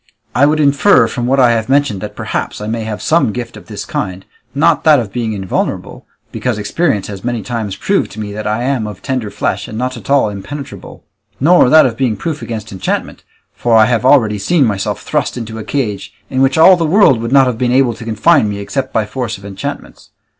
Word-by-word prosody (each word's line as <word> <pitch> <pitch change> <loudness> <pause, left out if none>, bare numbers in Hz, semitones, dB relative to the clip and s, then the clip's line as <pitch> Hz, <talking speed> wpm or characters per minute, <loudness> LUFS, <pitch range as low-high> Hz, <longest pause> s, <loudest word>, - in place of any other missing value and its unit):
I 140 +3 +4
would 155 +1 +1
infer 140 - +4
from 120 0 -3
what 135 +2 +2
I 125 -2 +5
have 115 0 -1
mentioned 135 -8 +1
that - - -7
perhaps - - -4
I 105 - -6
may 110 +1 -3
have 105 -4 -5
some 160 -8 +2
gift 120 +1 -6
of - - -13
this - - -7
kind, 95 +1 -4 0.3
not 155 +4 +2
that 155 -3 +5
of 110 -5 -5
being 115 -3 -2
invulnerable, 95 -3 -4 0.2
because 125 -4 -2
experience 105 - -1
has 100 -2 -8
many 120 -3 -2
times 110 -5 -4
proved 195 - 0
to - - -9
me 105 -1 -5
that 105 0 -5
I 110 +3 -1
am 125 -4 -1
of 105 -3 -9
tender 130 -6 -2
flesh - - -3
and 110 - -7
not 130 +2 -3
at - - -12
all 140 -4 +3
impenetrable; 135 +8 -9 0.4
nor 165 -1 +5
that 155 +2 +7
of 115 -3 -2
being 125 -5 0
proof 160 -3 -4
against 110 -2 -6
enchantment, 95 -2 -4 0.3
for 115 -2 +2
I 110 - +6
have 115 -2 0
already 120 -6 +3
seen 150 - +2
myself 100 -3 -2
thrust - - -2
into 110 -1 -6
a - - -6
cage, 105 -7 -3 0.2
in 130 0 0
which 135 +1 +2
all 175 +4 +8
the 170 - -1
world 155 - +4
would 115 +1 -4
not 135 -1 +6
have 125 -3 -2
been 125 -1 +1
able 130 -2 +3
to 115 - -10
confine 110 -1 +2
me 100 - -4
except 130 +6 -4
by 110 - 0
force 120 0 -4
of 100 - -14
enchantments. 95 -1 -7
120 Hz, 225 wpm, -15 LUFS, 105-135 Hz, 0.4 s, all